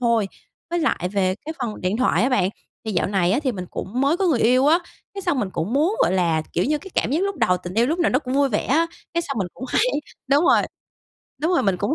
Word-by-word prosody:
thôi. 230 -4 +2 0.4
Với 345 - 0
lại 225 - 0
về 185 -2 +1
cái 315 - -4
phần 235 -4 -4
điện 185 +4 0
thoại 230 -6 +2
á 255 - +3
bạn, 220 -8 +2 0.4
thì 220 - -3
dạo - - +1
này 190 -2 +1
á 225 - +2
thì 260 -3 0
mình 185 -3 -5
cũng 230 +7 -4
mới 280 +5 +3
có 385 - 0
người 290 -8 +2
yêu 255 +4 +4
á, 325 +3 +5 0.4
cái 395 - -5
xong 350 -7 0
mình 200 -6 -1
cũng 185 +5 -3
muốn, 325 - +2
gọi - - +2
là, 165 -4 +1
kiểu 175 - +1
như, 300 +2 +1
cái 385 +3 -12
cảm - - +1
giác 325 +6 +1
lúc 395 -1 -1
đầu, 180 0 +2
tình 180 +1 -8
yêu 235 +2 +3
lúc 325 +5 -1
nào 340 - +2
nó 255 - +3
cũng 260 -2 -4
vui 280 0 +3
vẻ 210 - -1
á. 325 +5 +3 0.3
Cái 340 - +1
xong 275 -7 -4
mình 190 - 0
cũng 260 - -7
hay - - +2 0.5
đúng 290 +4 +4
rồi, - - +5 0.8
đúng 340 +3 +2
rồi, 350 - +3
mình 195 -3 +1
cũng 290 - 0
255 Hz, 280 wpm, -22 LUFS, 195-310 Hz, 0.8 s, á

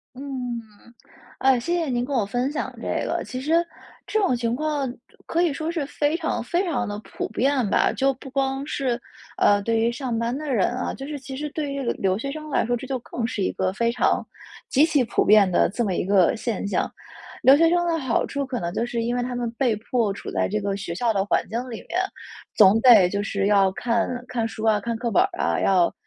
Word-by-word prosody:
嗯， 265 - -8 1.2
呃， 265 -1 +4
谢 295 +9 -1
谢 340 -2 0
您 245 -2 0
跟 275 +2 -3
我 230 - +2
分 245 +6 -1
享 305 - -3
这 - - -2
个。 - - -1
其 255 - -6
实， 330 +5 +2 0.4
这 435 - 0
种 380 -11 +2
情 235 -1 -1
况， 290 -2 -1 0.3
可 335 - 0
以 340 -4 +2
说 315 +3 -3
是 320 -5 -2
非 295 +2 0
常 325 -8 -2
非 345 +10 0
常 255 -10 -1
地 205 -1 -4
普 - - -5
遍 255 0 +1
吧。 - - +3
就 270 0 +2
不 265 +1 -11
光 270 0 -1
是， 255 -5 -1 0.4
呃， 205 0 +4
对 225 +1 +1
于 230 +1 +2
上 245 -2 -3
班 230 +2 -1
的 295 -1 -3
人 205 -7 +2
啊， 245 +1 -3
就 270 - -7
是 295 -1 -5
其 265 0 -8
实 300 +2 -3
对 295 -1 -3
于 280 - -3
留 190 0 0
学 275 +4 -4
生 305 +1 -7
来 - - +2
说， 245 +1 0
这 250 - -7
就 265 0 -2
更 235 0 -4
是 230 -4 -3
一 - - +1
个 185 0 -1
非 235 +4 +1
常 245 - +1 0.4
极 280 +3 +4
其 300 -4 +3
普 230 - +1
遍 205 -2 +6
的 175 - +3
这 235 - -2
么 190 - -1
一 - - -1
个 195 +1 +3
现 220 -3 -3
象。 - - 0 0.5
留 270 +2 +8
学 330 +1 +5
生 345 0 +2
的 335 -1 +1
好 260 -6 0
处 280 0 -3
可 255 -2 -3
能 170 -1 -3
就 230 - 0
是 240 -1 -2
因 240 +2 -1
为 245 - 0
他 245 0 -3
们 240 -1 -2
被 240 -1 +1
迫 220 -1 0
处 - - -7
在 - - 0
这 215 +2 -1
个 200 -1 -2
学 190 -4 -5
校 230 +5 +1
的 195 -1 +1
环 205 - +1
境 225 - -2
里 230 - -5
面。 355 - -2 0.6
总 205 +1 +6
得， 220 -8 +8
就 200 +2 -2
是 200 -1 -1
要 200 -2 +4
看 230 +3 0 0.2
看 235 -3 -1
书 220 -1 -6
啊， 215 -1 +4
看 235 +2 -3
课 235 +1 -2
本 360 - +4
儿 390 - +1
啊。 - - +1
要， 185 -3 +3
245 Hz, 260 characters per minute, -24 LUFS, 215-280 Hz, 1.2 s, 留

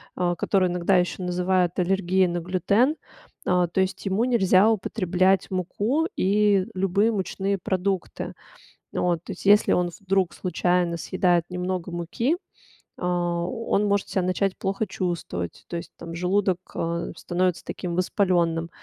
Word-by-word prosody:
а, 175 -1 0
которую 185 +1 +1
иногда 180 +2 +2
ещё 180 +1 -1
называют 180 0 +1
аллергией 190 0 +2
на 175 0 -2
глютен. 200 - +2 0.5
А, 180 -1 +3
то 175 +3 0
есть 190 +1 -2
ему 195 +4 +1
нельзя 210 -4 +4
употреблять 190 -3 +1
муку 205 - 0
и 200 0 +3
любые 195 +4 +2
мучные 195 -1 -1
продукты. 190 0 -2 0.6
Вот, 175 -2 0
то - - -7
есть, - - -9
если 205 +1 +5
он 180 0 +1
вдруг 190 -3 +1
случайно 180 0 0
съедает 175 0 +1
немного 180 0 -3
муки, 175 - -1 0.6
а, 175 -1 -1
он 225 0 0
может 200 -1 0
себя 190 - 0
начать 185 +1 0
плохо 195 +3 -1
чувствовать. 170 - -4
То 170 - -3
есть, 170 - -8
там, 165 0 -8
желудок, 185 +1 +1 0.2
а, 170 0 -2
становится 180 -1 -1
таким 175 -2 -4
воспалённым. 175 -3 +1
185 Hz, 140 wpm, -25 LUFS, 175-195 Hz, 0.6 s, если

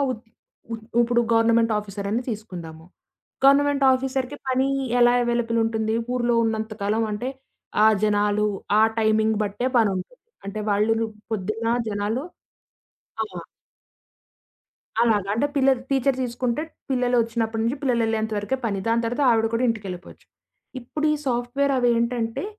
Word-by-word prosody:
వు - - +1 0.6
వు 230 - -2 0.3
ఇప్పుడు 240 0 +3
గవర్నమెంట్ 230 0 +3
ఆఫీసరని 205 +2 -3
తీసుకుందాము 175 -8 -7 0.6
గవర్నమెంట్ 280 0 +4
ఆఫీసర్‌కి 265 +1 -2
పని 260 +1 +2 0.3
ఎలా 240 0 +6
అవైలబుల్ 235 -1 0
ఉంటుంది? 220 -1 -1 0.2
ఊరిలో 240 -1 +1
ఉన్నంత 220 0 -2
కాలం 215 +3 +1
అంటే 245 +5 -3 0.6
ఆ - - +8 0.2
జనాలు, 210 0 +2 0.3
ఆ - - +6 0.2
టైమింగ్ 220 0 +2
బట్టే 210 +5 -1
పనుంటుంది. 205 - -1 0.2
అంటే 205 +2 -4
వాళ్ళు‌ 210 +2 +2
రు 225 - +1 0.3
పొద్దున్న 215 +3 -2 0.2
జనాలు 210 +7 -2 1.0
ఆ! - - 0 1.8
అలాగా 210 -4 +2
అంటే 280 +6 +1
పిల్లలు 265 -2 +3
టీచర్ 270 -1 +2
తీసుకుంటే 245 +3 -2 0.3
పిల్లలు 250 -1 +1
ఒచ్చినప్పటి 225 -1 -2
నుంచి 235 +5 0
పిల్లలేళ్ళేంత 225 -4 0
వరకే 205 +6 -2
పని, 200 -3 -1
దాని 230 +1 +2
తర్వాత 245 +5 -1
ఆవిడ 225 -1 +3
కూడా 235 +2 +1
ఇంటికేళ్ళిపోచ్చు. 195 -5 -5 0.5
ఇప్పుడు 300 +5 -5
ఈ - - +2
సాఫ్ట్‌వేర్ 250 +3 0
అవేంటంటే, 235 0 0
230 Hz, 130 wpm, -24 LUFS, 215-250 Hz, 1.8 s, ఆ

